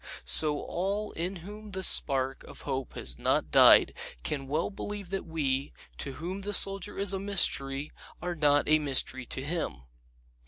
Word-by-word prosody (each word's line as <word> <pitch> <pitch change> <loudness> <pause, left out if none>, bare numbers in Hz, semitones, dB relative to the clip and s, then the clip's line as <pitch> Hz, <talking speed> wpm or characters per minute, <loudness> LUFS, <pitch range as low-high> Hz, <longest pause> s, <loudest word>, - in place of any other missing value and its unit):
So 150 - +6
all 200 +4 -3
in 180 +4 -4
whom 210 0 -10
the 190 0 -4
spark 135 -5 +1
of - - -11
hope 130 -1 -4
has - - -1
not - - 0
died - - +7 0.3
can 135 - -3
well 155 +7 -2
believe 205 -2 -7
that 195 -2 -4
we, 140 -4 -2 0.3
to 140 - -4
whom 180 +7 -6
the 205 +1 -5
Soldier 195 -1 +2
is 200 0 +1
a 195 - -2
mystery, 150 -8 0 0.3
are 175 +1 -4
not 145 -3 +2
a 155 0 +4
mystery 130 -3 0
to 135 - -3
him. 140 - -4
160 Hz, 165 wpm, -28 LUFS, 135-195 Hz, 0.3 s, died